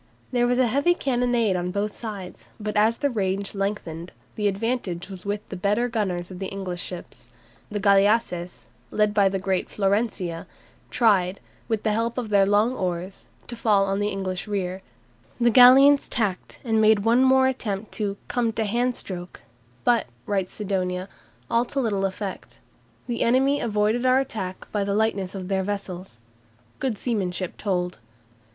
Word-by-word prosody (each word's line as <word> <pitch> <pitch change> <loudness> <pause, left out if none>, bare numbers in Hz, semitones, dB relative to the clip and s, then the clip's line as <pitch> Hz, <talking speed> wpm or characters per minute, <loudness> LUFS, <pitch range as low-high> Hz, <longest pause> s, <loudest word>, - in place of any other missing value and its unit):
There 245 -1 +2
was 245 0 +2
a 255 - +4
heavy 285 +9 +2
cannonade 245 - +1
on 180 0 -1
both 200 +2 -2
sides, 205 -5 -7
but 210 0 -4
as 220 +2 +3
the 285 - 0
range 195 -2 -1
lengthened, 195 -4 -4 0.2
the 210 -1 0
advantage 200 -4 -2
was 190 0 -9
with 205 +1 -3
the - - -5
better 205 +6 +1
gunners 190 -6 -2
of 180 - -8
the 190 - -3
English 185 -3 -5
ships. 180 -2 -8 0.4
The 210 - -3
galleasses, 200 -3 +2 0.2
led 210 -1 +1
by 200 -2 +4
the 195 - -1
great 190 -1 -1
"Florencia," 195 -4 -1 0.4
tried, 195 -5 +2 0.3
with 225 -2 -1
the 215 - +2
help 230 +3 -1
of 240 -4 -3
their 200 -2 +4
long 210 +5 +3
oars, 185 -3 -4 0.2
to 240 - -7
fall 210 -4 +3
on 195 0 -1
the 205 - +1
English 190 -1 -3
rear, 190 -2 -2 0.6
the 235 0 +4
galleons 270 +4 +7
tacked 205 -6 -2
and 225 -3 +2
made 215 -1 +4
one 235 +3 +4
more 265 0 +5
attempt 215 -6 -2
"to 200 -2 -2
come 240 -2 0
to 220 0 -1
hand 240 +4 0
stroke," 180 -2 -5 0.4
but, 235 -3 +3 0.2
writes 195 -3 -1
Sidonia, 185 -2 -2 0.4
"all 235 +1 +2
to 275 - -3
little 205 -6 0
effect, 195 0 -5 0.5
the 240 -2 -3
enemy 270 +4 +3
avoiding 220 +3 +1
our 255 0 +5
attack 195 -8 -5
by 205 -1 0
the 200 0 -1
lightness 205 -3 0
of 185 -2 -5
their 190 0 0
vessels." 185 - -5 0.6
Good 255 -6 -1
seamanship 190 -6 -2
told. 180 -3 -2
205 Hz, 165 wpm, -24 LUFS, 190-230 Hz, 0.6 s, galleons